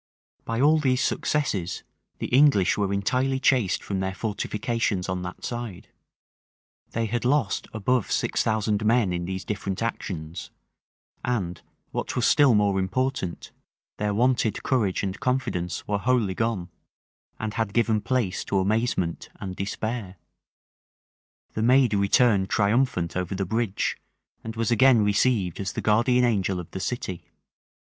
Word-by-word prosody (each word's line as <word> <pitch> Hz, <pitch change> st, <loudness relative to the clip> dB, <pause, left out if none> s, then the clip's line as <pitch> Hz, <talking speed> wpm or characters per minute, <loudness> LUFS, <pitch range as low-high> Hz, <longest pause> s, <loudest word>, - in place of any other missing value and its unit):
By 115 Hz, 0 st, -2 dB
all 155 Hz, +4 st, +5 dB
these 130 Hz, -3 st, +1 dB
successes, 95 Hz, -, -1 dB, 0.3 s
the -, -, -4 dB
English 130 Hz, -8 st, +4 dB
were 100 Hz, -2 st, 0 dB
entirely 130 Hz, +7 st, 0 dB
chased 125 Hz, -7 st, +2 dB
from 100 Hz, -2 st, -3 dB
their 95 Hz, 0 st, -2 dB
fortifications 105 Hz, -2 st, -2 dB
on 90 Hz, -1 st, -2 dB
that 90 Hz, 0 st, -7 dB
side: 120 Hz, -6 st, -6 dB, 1.0 s
they 115 Hz, 0 st, 0 dB
had 120 Hz, +2 st, -2 dB
lost 125 Hz, -5 st, +1 dB
above 110 Hz, +2 st, 0 dB
six -, -, +1 dB
thousand 110 Hz, -1 st, 0 dB
men 110 Hz, -4 st, +3 dB
in 85 Hz, 0 st, -2 dB
these 95 Hz, +1 st, -4 dB
different 100 Hz, 0 st, -3 dB
actions; 85 Hz, -7 st, -4 dB, 0.7 s
and, 95 Hz, -9 st, -2 dB, 0.3 s
what -, -, -3 dB
was 125 Hz, -, +1 dB
still 140 Hz, -6 st, +5 dB
more 100 Hz, -2 st, +2 dB
important, 100 Hz, -1 st, -2 dB, 0.5 s
their 105 Hz, 0 st, 0 dB
wonted 120 Hz, 0 st, +1 dB
courage 110 Hz, -9 st, +1 dB
and 95 Hz, -1 st, -3 dB
confidence 125 Hz, -, -2 dB
were 100 Hz, -1 st, 0 dB
wholly 115 Hz, -4 st, +1 dB
gone, 105 Hz, -5 st, -2 dB, 0.7 s
and 110 Hz, -1 st, -3 dB
had 110 Hz, -3 st, -1 dB
given 110 Hz, -1 st, +2 dB
place 120 Hz, -7 st, -1 dB
to 100 Hz, -, 0 dB
amazement 95 Hz, -3 st, 0 dB
and 95 Hz, -1 st, -6 dB
despair. 105 Hz, 0 st, -4 dB, 1.4 s
The 110 Hz, -, -2 dB
maid 125 Hz, 0 st, +4 dB
returned 100 Hz, 0 st, +3 dB
triumphant 105 Hz, -4 st, +1 dB
over 90 Hz, +1 st, -2 dB
the 95 Hz, 0 st, -1 dB
bridge, 110 Hz, 0 st, -1 dB, 0.4 s
and 110 Hz, 0 st, -6 dB
was 115 Hz, +1 st, -1 dB
again 120 Hz, -1 st, +5 dB
received 105 Hz, -3 st, +1 dB
as 95 Hz, -1 st, -3 dB
the -, -, -3 dB
guardian 125 Hz, +4 st, +3 dB
angel 100 Hz, -5 st, 0 dB
of 90 Hz, -, -9 dB
the -, -, -5 dB
city. 95 Hz, -3 st, -4 dB
105 Hz, 140 wpm, -25 LUFS, 95-120 Hz, 1.4 s, all